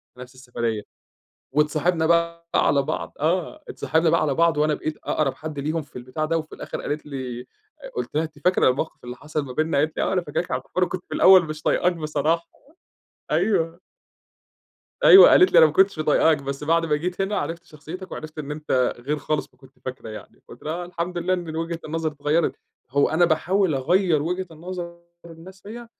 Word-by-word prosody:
في - - -19
نفس 125 +1 -11
السفرية 120 -4 -3 0.7
واتصاحبنا 155 +3 +1
بقى 170 0 +1
على 140 -1 +3
بعض، 155 +3 -4
آه، 185 - -1
اتصاحبنا 160 +1 +1
بقى 165 - +3
على 145 -3 0
بعض، 170 0 +3
وأنا 150 0 +2
بقيت 155 +1 -4
أقرَب 145 -3 0
حد 155 -1 -7
ليهم 155 +3 -2
في 150 - -17
البتاع 130 +5 -4
ده، 165 +1 0
وفي 155 -1 -8
الآخِر - - -6
قالت 150 +1 -4
لي 130 -4 -5 0.4
أ - - -9
قُلت - - -4
لها: 155 +2 +1
"أنتِ 155 -2 -10
فاكرة 180 +2 +3
الموقف 135 +4 -2
اللي 125 0 -7
حصل 150 +2 -4
ما 130 - -8
بيننا؟" 155 +1 0
قالت 155 +2 0
لي: - - -1
"آه، - - -1
أنا 180 - +1
فاكراك 170 +2 -3
على - - -1
فكرة، - - -30
وأنا 185 - +3
كنت 185 0 -5
في - - -5
الأول 185 -1 +7
مش 155 0 -7
طايقاك 180 +1 +2
بصراحة." 160 +1 -1 0.8
أيوه. 165 -5 +1 1.2
أيوه، 390 - +10
قالِت 370 - +6
لي: - - +7
"أنا 160 - +9
ما 155 - -3
كنتش 190 +4 +3
طايقاك، 155 0 +3
بس 140 +1 -5
بعد 165 +2 +2
ما 150 -2 +1
جيت 180 +5 -4
هنا 200 +2 0
عرفت 165 +3 -4
شخصيتك 170 +5 -10
وعرفت 155 0 -8
إن 150 -1 -5
أنتَ 150 -4 0
غير 140 +5 -2
خالص 150 +1 -2
ما - - -30
كنت 135 -1 -20
فاكرة 130 -3 -6
يعني." 110 - -11
فقُلت - - -13
لها: 155 - -3
"آه، 175 +1 -4
الحمد 175 0 -4
لله 185 +2 +1
إن 175 -2 -5
إن 160 - -5
وجهة 165 0 -3
النظر 160 0 -2
اتغيَّرت." 150 +3 0 0.3
هو 140 +1 +3
أنا 160 +3 +3
باحاول 175 +2 +1
أغيِّر 165 +3 +2
وجهة 180 +4 -2
نظر 170 +1 -7 0.2
الناس 170 +3 -13
فيَّ، 235 +3 -9
160 Hz, 210 wpm, -23 LUFS, 145-175 Hz, 1.2 s, أيوه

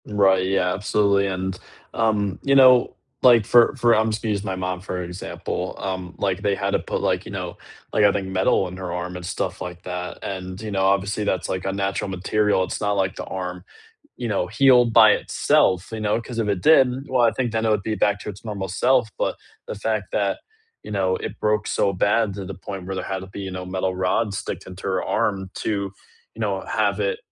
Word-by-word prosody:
Right, 95 -3 +3
yeah, 95 -2 +1
absolutely, 100 0 +2
and, 95 -1 -3 0.4
um, 105 -4 0
you 140 0 +3
know, 130 -2 +6 0.3
like, 120 -4 +6
for 120 +4 +5
for 120 -2 +3
I'm 110 0 +3
just 110 0 -3
gonna 110 - 0
use 100 -1 -1
my 95 -2 -3
mom 90 -1 -3
for 95 -1 -5
an 90 - -3
example, 90 +2 -5
um, 95 -2 -5
like, 95 -1 -1
they 100 -1 +1
had - - -2
to - - +2
put, - - -3
like, - - 0
you - - -8
know, - - -5 0.4
like, 105 - +3
I 100 - +6
think 100 -1 -2
metal 95 0 +2
in 90 +1 -8
her 95 -2 -5
arm 90 +1 -4
and 90 - -7
stuff - - -3
like 90 -1 -7
that, 90 0 -5
and, 95 -1 -5
you 110 -1 -6
know, 95 -1 +1
obviously, 100 +2 +1
that's, 95 -4 -1
like, 95 0 -3
unnatural 95 0 -2
material. 95 +1 +1
It's - - -4
not 105 -1 +1
like 95 -2 0
the - - -6
arm, 90 -1 -5 0.6
you 120 - -3
know, 100 -4 0
healed 125 -2 +5
by 110 -2 +8
itself, 95 -1 +2
you 110 - -4
know, 105 +2 +1
'cause 115 0 -8
if 110 -2 0
it 100 -3 0
did, 135 -3 +4
well, 130 -2 +2
I 115 - +5
think 120 0 -2
then 110 0 0
it 110 - +2
would 105 -2 +1
be 110 +2 -2
back 105 -1 +1
to - - -8
its 100 +1 -8
normal 100 -3 -4
self, 125 +5 +2
but - - -1 0.3
the - - -5
fact 105 -2 -2
that, 100 -2 0 0.4
you - - -10
know, 95 -2 +1
it 110 - -7
broke 105 0 +1
so 100 - +1
bad 105 +2 +2
to 100 -1 -6
the 95 +1 -6
point 95 +1 -7
where 95 +1 -4
there 95 - -3
had 95 -1 -3
to 95 - -8
be, 100 - -8
you 95 -1 -5
know, 90 0 -5
metal 95 0 -2
rods 95 +3 0
sticked - - -5
into 95 0 -10
her 95 -1 0
arm 95 -2 -1
to, - - -3 0.6
you - - -11
know, - - -1
have - - 0
it - - 0
100 Hz, 235 wpm, -23 LUFS, 95-110 Hz, 0.6 s, by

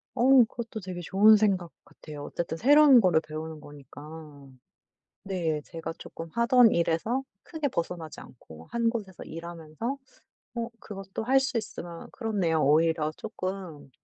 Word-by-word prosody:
어 255 0 +6
그것도 230 0 -7
되게 185 -3 -7
좋은 205 +5 +6
생각 190 -5 +1
같아요. 150 -2 -10
어쨌든 165 +2 -4
새로운 280 - +7
거를 175 -5 +3
배우는 155 0 -7
거니까. 145 +1 -12 0.8
네. 170 -6 -2
제가 165 -1 -6
쪼끔 165 0 -9
하던 235 0 +5
일에서 170 +10 0 0.2
크게 315 -4 -3
벗어나지 170 - -4
않고 80 -9 -14
1 235 -1 +1
곳에서 205 -6 -6
일하면서 170 - -6 0.6
어 230 0 -3
그것도 195 0 -7
할 265 +3 +4
수 260 -3 -1
있으면 175 -6 -8
그렇네요. 195 - 0
오히려 155 +1 +3
쪼끔 185 -9 -6
180 Hz, 300 characters per minute, -27 LUFS, 160-230 Hz, 0.8 s, 새로운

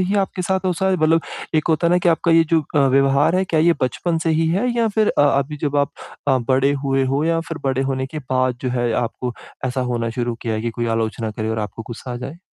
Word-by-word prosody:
ही 185 +2 0
आपके 185 -1 -6
साथ 190 +1 -1
हो 185 - +2
सा 190 +2 -1
है 190 - +2
मतलब 160 +1 +3 0.3
एक 155 +2 +1
होता 160 +1 +2
है 170 - +3
ना 180 - +4
कि 175 - +1
आपका 170 +1 +2
ये 165 0 +6
जो 165 -1 +4
अ, 150 - +3
व्यवहार 135 +5 +3
है, 190 - +2
क्या 165 -4 +1
ये 170 +2 +5
बचपन 165 +6 0
से 165 - +2
ही 160 +1 +2
है 195 +9 +1
या 230 -1 +2
फिर 215 -1 +4
अ - - +6 0.2
अभी 145 +2 -3
जब 145 -1 0
आप 140 -1 +1 0.4
अ, 130 - +4
बड़े 135 +2 +3
हुए 135 -1 +2
हो 145 +3 +1
या 165 0 +1
फिर 165 - -5
बड़े 135 0 +1
होने 130 -1 -1
के 155 +2 -6
बाद 130 -1 0 0.3
आपको 120 0 -2 0.3
ऐसा 130 +1 -2
होना 115 -1 -1
शुरू 120 0 -2
किया 115 -2 -1
है 110 - -2
कि 115 - -1
कोई 120 +1 -3
आलोचना 110 0 -2
करे 110 +1 -4
और 110 - -2
आपको 110 +1 -5
गुस्सा 125 +1 -7
आ - - -4
जाए? 125 +7 -7
140 Hz, 265 wpm, -20 LUFS, 125-165 Hz, 0.4 s, ये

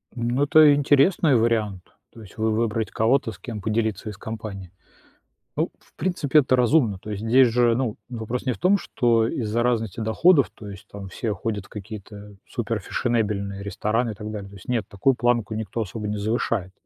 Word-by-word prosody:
Ну, 120 +3 0
это 150 0 +7
интересный 145 +1 +4
вариант. 110 -5 +1 0.3
То 115 - -13
есть, 100 -5 -14
вы 110 0 +1
выбрать 110 0 -1
кого-то, 115 +1 +2
с 95 - -13
кем 110 -5 -6
поделиться 110 0 -1
из 100 - -8
компании. 105 -5 -7 0.8
Ну, - - 0
в - - -28
принципе, 155 -4 +2
это 130 -2 +3
разумно. 125 -5 +3
То 105 - -10
есть 105 +1 -5
здесь 125 +3 +5
же, 120 0 +3
ну, 120 -3 -1
вопрос 120 +1 -4
не 130 - +1
в - - -11
том, 190 +3 +4
что 115 - +1
из-за 115 -1 -1
разности 115 -4 -1
доходов, 140 +7 +3
то 105 - -10
есть, 100 -2 -11
там, 100 -2 -9
все 110 +3 -3
ходят 105 -2 -4
в - - -19
какие-то 105 0 -9
суперфешенебельные 105 -3 -2
рестораны 110 +3 -1
и - - -5
так 105 +1 -7
далее. 100 -2 -6
То 100 - -14
есть, 95 - -14
нет. 120 -4 0
Такую 125 +7 +1
планку 120 -3 +1
никто 110 +1 -3
особо 105 +1 -5
не 105 0 -2
завышает. 105 -2 -1
110 Hz, 190 wpm, -24 LUFS, 105-125 Hz, 0.8 s, это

